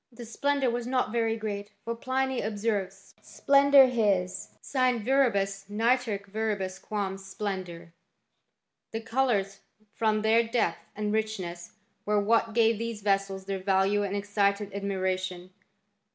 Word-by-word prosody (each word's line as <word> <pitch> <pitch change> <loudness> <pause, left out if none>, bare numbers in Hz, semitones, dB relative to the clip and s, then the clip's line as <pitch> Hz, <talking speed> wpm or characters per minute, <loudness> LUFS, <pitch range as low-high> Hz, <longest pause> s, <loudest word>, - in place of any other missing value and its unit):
The 240 0 -10
splendour 275 +2 0
was 240 0 -3
not 255 -3 0
very 225 -1 0
great, 205 -1 -5
for 230 - -2
Pliny 260 +2 -1
ob 210 0 -3
serves, 195 -3 -3
" - - -31 0.2
Splendor 280 -1 +6
his 200 -7 0
sine 255 -5 0
viribus 200 -7 +1
nitorque 225 -1 +1
verius 200 -3 -2
quam 195 -2 -3
splendor." 185 -4 -6 1.0
The 225 - -3
colours, 225 -5 0 0.3
from 215 -1 +1
their 225 +1 +5
depth 230 +1 0 0.2
and 210 0 -2
richness, 190 -6 -3 0.3
werewhat 210 +2 +2
gave 225 -2 +3
these 230 -3 -4
vessels 195 -1 0
theit 195 -1 -4
value 195 +1 +2
and 200 -1 -2
excited 200 0 0
admiration. 185 -2 -3
210 Hz, 130 wpm, -28 LUFS, 195-230 Hz, 1.0 s, Splendor